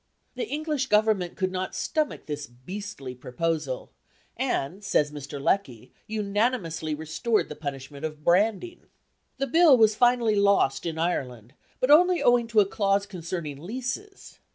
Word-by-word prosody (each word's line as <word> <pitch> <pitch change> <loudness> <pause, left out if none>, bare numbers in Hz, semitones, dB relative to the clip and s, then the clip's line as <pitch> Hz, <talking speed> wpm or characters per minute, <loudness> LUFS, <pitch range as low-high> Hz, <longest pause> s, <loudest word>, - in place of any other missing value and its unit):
The 460 - -4
English 300 -4 -2
Government 210 -5 +2
could 185 -2 -1
not 185 0 -4
stomach 310 -1 -2
this 145 -1 -5
beastly 135 +2 -8
proposal; 140 +2 -3 0.4
and, 175 +10 -2
says 150 -7 +1
Mr. 145 -1 -7
Lecky, 130 - -1 0.2
unanimously 205 -7 -1
restored 160 +9 -1
the 150 - -6
punishment 140 -1 -7
of 155 -1 -5
branding. 215 - +1 0.5
The 275 - 0
Bill 315 0 +6
was 220 -2 +5
finally 240 -1 +3
lost 200 -9 +2
in 160 -1 -4
Ireland, 125 -8 -3 0.3
but 255 - +2
only 355 +3 +6
owing 240 -1 +4
to 225 -2 +4
a - - +3
clause 200 0 +1
concerning 170 -6 -6
leases. 255 - -6
195 Hz, 140 wpm, -26 LUFS, 150-230 Hz, 0.5 s, Bill